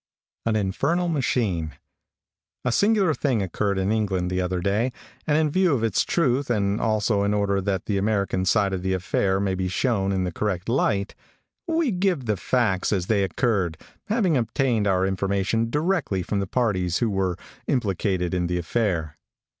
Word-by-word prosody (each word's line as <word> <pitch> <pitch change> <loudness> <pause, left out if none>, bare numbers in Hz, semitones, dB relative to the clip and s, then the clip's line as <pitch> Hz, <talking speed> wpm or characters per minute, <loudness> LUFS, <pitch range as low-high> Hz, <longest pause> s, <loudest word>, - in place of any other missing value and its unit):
AN 110 - +2
INFERNAL 160 - 0
MACHINE. 105 - 0 0.9
|A 130 - +2
SINGULAR 200 - +3
thing 130 -8 0
occurred 100 +2 -1
in 95 +2 0
England 95 -5 0
the 90 0 0
other 90 0 -1
day, 105 +7 0 0.4
and 150 -1 +3
in 155 -2 +2
view 180 -3 +3
of 115 - -2
its 110 -4 +2
truth, 140 -5 +1
and 100 -3 +1
also 110 -1 +1
in 100 +1 +1
order 100 -1 +1
that 95 -2 -2
the 100 -2 0
American 100 -2 0
side 100 +1 +2
of 95 - -2
the 95 +1 -1
affair 95 +1 0
may 100 -1 0
be 95 0 -1
shown 100 0 0
in 95 -1 0
the 90 - -2
correct 95 -1 -2
light, 105 -5 +1 0.5
we 325 -5 +1
give 180 -7 0
the 105 -2 +1
facts 95 -2 0
as 95 -4 0
they 100 0 +2
occurred, 95 - 0 0.3
having 210 -7 +1
obtained 120 -2 +1
our 95 -1 +2
information 100 +4 0
directly 150 - 0
from 100 +3 -2
the 100 - -2
parties 95 -7 0
who 115 -3 0
were 95 -3 0 0.3
implicated 95 -6 0
in 90 -1 0
the 90 0 -1
affair. 85 -5 -1
100 Hz, 175 wpm, -24 LUFS, 95-125 Hz, 0.9 s, SINGULAR